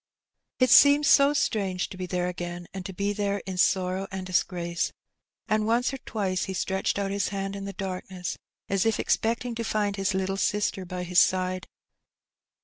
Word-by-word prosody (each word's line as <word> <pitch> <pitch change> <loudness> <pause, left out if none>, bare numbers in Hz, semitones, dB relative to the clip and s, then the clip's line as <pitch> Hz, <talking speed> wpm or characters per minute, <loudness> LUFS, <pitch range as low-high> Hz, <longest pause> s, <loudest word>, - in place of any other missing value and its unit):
It 255 -2 +3
seemed 285 +1 +7
so 280 0 +6
strange 200 -10 0
to - - -8
be 185 0 -5
there 180 0 -1
again, 175 0 -5
and 190 -1 -5
to - - -6
be 200 +2 -1
there 200 -1 -1
in 190 -1 -5
sorrow 185 +1 +1
and 190 -1 -5
disgrace; 175 -2 -1 0.6
and 215 0 +1
once 240 +4 +2
or 270 - -5
twice 195 -6 -2
he 190 - -5
stretched 190 +2 -1
out 200 -1 -1
his 200 0 0
hand 195 0 -3
in 200 0 -6
the 200 - -5
darkness 185 -2 -5 0.3
as 195 -1 +1
if 225 - +1
expecting 235 +2 0
to 230 0 -3
find 205 -2 -1
his 195 0 0
little 190 0 -1
sister 200 -2 0
by 180 0 -5
his 180 0 +3
side. 185 0 +1
195 Hz, 185 wpm, -27 LUFS, 185-210 Hz, 0.6 s, seemed